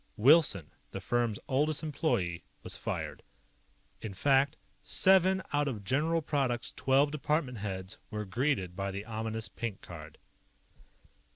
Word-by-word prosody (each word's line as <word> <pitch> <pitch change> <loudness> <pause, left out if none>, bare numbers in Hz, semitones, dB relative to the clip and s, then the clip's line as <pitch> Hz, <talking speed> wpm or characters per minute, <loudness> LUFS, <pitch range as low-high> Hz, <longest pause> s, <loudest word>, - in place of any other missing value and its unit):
Wilson, 125 - +5 0.2
the - - -6
firm's 120 -3 0
oldest 150 +4 +1
employee, 135 - -1 0.2
was - - -4
fired. - - -4 0.8
In 105 -4 -6
fact, 140 +5 +3 0.3
seven 190 0 +4
out 145 0 +2
of 110 -7 -4
General 155 +8 +1
Product's 135 -5 0
twelve 135 +2 +3
department 150 -5 -1
heads 95 -2 -4
were 105 0 -4
greeted 105 -4 -1
by 100 +1 -2
the 100 +2 -5
ominous 110 0 -3
pink 110 -4 -5
card. 80 -3 -10
125 Hz, 125 wpm, -31 LUFS, 100-145 Hz, 0.8 s, Wilson